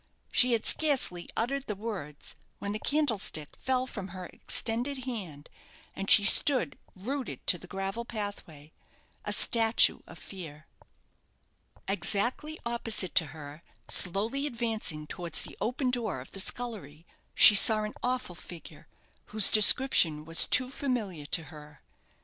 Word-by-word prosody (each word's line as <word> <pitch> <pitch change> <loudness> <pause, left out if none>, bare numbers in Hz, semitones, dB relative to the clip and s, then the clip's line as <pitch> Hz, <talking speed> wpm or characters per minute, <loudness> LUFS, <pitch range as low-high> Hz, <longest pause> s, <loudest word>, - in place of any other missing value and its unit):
She 250 -1 +2
had 225 - -2
scarcely 265 - 0
uttered 270 +4 -3
the 210 - -4
words 190 -9 -8 0.2
when 200 - -6
the 215 - -5
candlestick 225 - -2
fell 255 -1 -2
from 200 -7 -8
her 185 -1 -10
extended 245 +8 -3
hand, 180 - -8 0.5
and 195 +1 -6
she 240 -5 +7
stood 215 - +4 0.2
rooted 255 +7 -7
to 180 - +3
the 180 - -14
gravel 195 +5 -5
pathway 200 -10 -8 0.5
a - - -4
statue 225 -1 +4
of - - -13
fear. 160 -5 -11 1.2
Exactly 240 +10 -2
opposite 225 -5 +2
to 165 - +2
her, 150 +1 -12 0.3
slowly 220 +10 0
advancing 225 - -5
towards 170 +2 -6
the - - -10
open 250 +4 -2
door 225 - -3
of 125 - -13
the 195 - -8
scullery, 190 -9 -6 0.3
she - - +8
saw 215 +1 +7
an 215 - -6
awful 250 -6 -3
figure 170 0 -13 0.4
whose 215 -1 +2
description 205 - +5
was 165 +1 +3
too 255 0 0
familiar 215 - -5
to 165 - -1
her. 150 -1 -15
210 Hz, 140 wpm, -27 LUFS, 170-245 Hz, 1.2 s, she